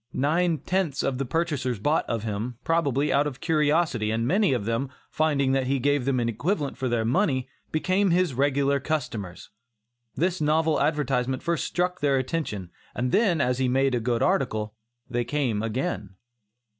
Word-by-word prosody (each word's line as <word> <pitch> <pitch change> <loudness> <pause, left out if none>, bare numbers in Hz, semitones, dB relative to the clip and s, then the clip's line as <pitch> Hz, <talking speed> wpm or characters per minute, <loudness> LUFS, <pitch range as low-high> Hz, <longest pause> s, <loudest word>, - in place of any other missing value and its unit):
Nine 165 +4 +1
tenths 175 -4 -1
of 130 -1 -1
the 135 - -2
purchasers 140 -5 -1
bought 145 +10 0
of 115 -3 -2
him, 110 +3 -3
probably, 150 -4 +1
out 145 +2 +3
of 135 -4 -6
curiosity, 150 -7 +1
and 115 +1 0
many 190 - +3
of 120 -6 -1
them, 115 +4 -1 0.2
finding 145 -4 +1
that 135 -1 +1
he 135 +1 +1
gave 145 0 +1
them 135 -2 +1
an 120 - 0
equivalent 145 - -1
for 130 -1 -2
their 115 -2 0
money, 130 - +1 0.2
became 185 +5 +1
his 175 -3 +2
regular 140 +1 +2
customers. 125 - -4 0.6
This 180 +1 0
novel 155 +1 +2
advertisement 135 -4 0
first 170 -1 0
struck 180 +1 -1
their 140 -2 +3
attention, 130 - -3 0.2
and 125 +1 -1
then 195 -8 +3
as 125 -1 +1
he 130 - +2
made 135 +1 +2
a 120 - +1
good 115 0 0
article, 110 - 0 0.3
they 120 0 -1
came 125 -6 -1
again. 110 -4 -3
135 Hz, 170 wpm, -26 LUFS, 120-160 Hz, 0.6 s, out